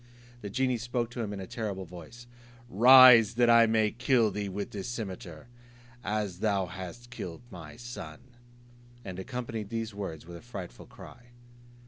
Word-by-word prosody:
The 100 - -6
genie 130 +2 0
spoke 120 0 -3
to 125 - -5
him 105 -3 -4
in 100 - -6
a 95 - -6
terrible 100 -3 -5
voice: 90 +8 -12 0.4
"Rise, 120 0 +8
that 120 0 +4
I 115 -1 +6
may 110 -1 +2
kill 120 -2 +2
thee 100 0 -4
with 100 +1 -5
this 100 -2 -6
cimeter, 95 -8 -7 0.6
as 105 -3 -3
thou 100 -3 +1
hast 95 +7 -9
killed 90 -4 -7
my 80 -5 -10
son;" 105 -10 -8 0.9
and 95 -1 -7
accompanied 115 -1 -5
these 115 -1 -4
words 95 -7 -6
with 85 0 -9
a - - -13
frightful 115 -7 -9
cry. 120 - -14
105 Hz, 160 wpm, -29 LUFS, 95-120 Hz, 0.9 s, Rise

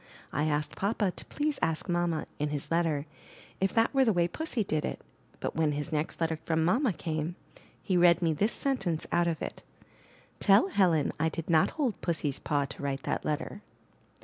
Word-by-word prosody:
I 150 - +1
asked 150 -1 -1
papa 200 -1 0
to - - -7
please 295 -1 -2
ask 160 +2 0
mamma, 175 -3 0
in 150 0 0
his 145 +1 -4
letter, 165 -4 +1 0.5
if 190 0 +1
that 225 +3 +3
were 270 -1 +5
the 230 - +4
way 175 -3 +2
Pussy 255 - -1
did 155 -5 -1
it; - - -3 0.4
but - - -3
when 155 -2 +2
his 150 +2 -3
next 155 0 -1
letter 160 -1 0
from 160 -1 +1
mamma 240 - +3
came, 160 -1 -3 0.5
he 185 - +1
read 175 -1 +6
me 165 -2 +2
this 205 +9 +1
sentence 195 - -1
out 170 0 +3
of 165 -2 -1
it: - - -6 0.8
*'Tell 195 0 +5
Helen 175 -7 +3
I 160 +1 +2
did 165 +1 -4
not 160 -1 +5
hold 265 - -1
Pussy's 155 -5 -1
paw 145 -1 0
to 140 - -9
write 140 -1 -2
that - - -2
letter.'' 155 +6 -3
170 Hz, 195 wpm, -29 LUFS, 155-195 Hz, 0.8 s, read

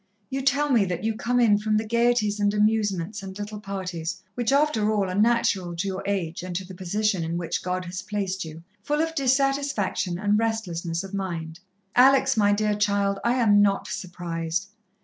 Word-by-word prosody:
You 270 +1 -1
tell 280 +2 +2
me 235 -5 +5
that 180 0 -3
you 225 0 +1
come 245 +3 0
in 210 -4 +4
from 215 0 +1
the 220 - -1
gaieties 235 -2 +2
and 205 0 +2
amusements 210 -2 +1
and 190 0 -8
little 210 0 -6
parties, 185 -5 -4
which, 240 0 -1
after 275 -7 +2
all, 205 -3 +1
are - - -3
natural 205 -4 +2
to 180 +4 -2
your 190 -1 -3
age 180 -5 -2
and 180 0 -6
to 190 +1 -3
the 185 - -10
position 190 +1 -1
in 165 +1 -2
which 170 -2 -2
God 180 0 -2
has 180 +1 -5
placed 195 -2 -3
you, 160 0 -9 0.2
full 295 +7 -1
of 325 0 -1
dissatisfaction 275 - 0
and 205 +2 +2
restlessness 180 -7 -2
of 195 0 -9
mind. 170 -4 -4 0.4
"Alex, 265 +1 +5
my 205 -2 +3
dear 210 +1 +1
child, 200 -1 +1
I 240 +1 +2
am 210 -5 +5
not 200 -1 +2
surprised. 175 0 -4
205 Hz, 190 wpm, -25 LUFS, 185-225 Hz, 0.4 s, me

